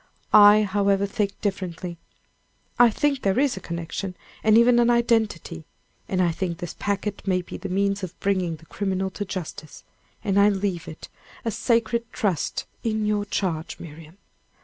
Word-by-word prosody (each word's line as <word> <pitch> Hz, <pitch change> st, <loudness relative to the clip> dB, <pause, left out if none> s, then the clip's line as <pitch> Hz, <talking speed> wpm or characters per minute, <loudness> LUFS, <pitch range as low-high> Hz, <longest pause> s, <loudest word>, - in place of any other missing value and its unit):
I, 210 Hz, 0 st, +8 dB
however, 200 Hz, 0 st, +1 dB
think 200 Hz, -1 st, -2 dB
differently. 180 Hz, -4 st, -4 dB, 0.8 s
I 240 Hz, -1 st, +8 dB
think 280 Hz, +4 st, 0 dB
there 195 Hz, -1 st, +1 dB
is 275 Hz, 0 st, +2 dB
a -, -, -6 dB
connection, 170 Hz, +2 st, -5 dB, 0.3 s
and 220 Hz, 0 st, +5 dB
even 240 Hz, +1 st, +6 dB
an 240 Hz, 0 st, +4 dB
identity; 225 Hz, -8 st, +1 dB, 0.5 s
and 185 Hz, -1 st, +1 dB
I 170 Hz, -, +2 dB
think 170 Hz, 0 st, -3 dB
this 175 Hz, -2 st, -6 dB
packet 205 Hz, 0 st, -3 dB
may 185 Hz, -1 st, +1 dB
be -, -, -9 dB
the 195 Hz, -, -6 dB
means 200 Hz, +2 st, 0 dB
of 185 Hz, -2 st, -7 dB
bringing 185 Hz, -4 st, 0 dB
the 160 Hz, -, -17 dB
criminal 190 Hz, +1 st, -2 dB
to 205 Hz, -, -4 dB
justice; 165 Hz, -5 st, -7 dB, 0.4 s
and 200 Hz, 0 st, +2 dB
I 205 Hz, +1 st, +6 dB
leave 190 Hz, -4 st, -2 dB
it 155 Hz, -, -9 dB, 0.4 s
a 225 Hz, -, 0 dB
sacred 235 Hz, +1 st, 0 dB
trust 190 Hz, -8 st, -1 dB, 0.2 s
in 215 Hz, -2 st, -1 dB
your 210 Hz, -1 st, 0 dB
charge, 170 Hz, -6 st, -3 dB
Miriam. 160 Hz, +2 st, -11 dB
195 Hz, 165 wpm, -24 LUFS, 180-215 Hz, 0.8 s, I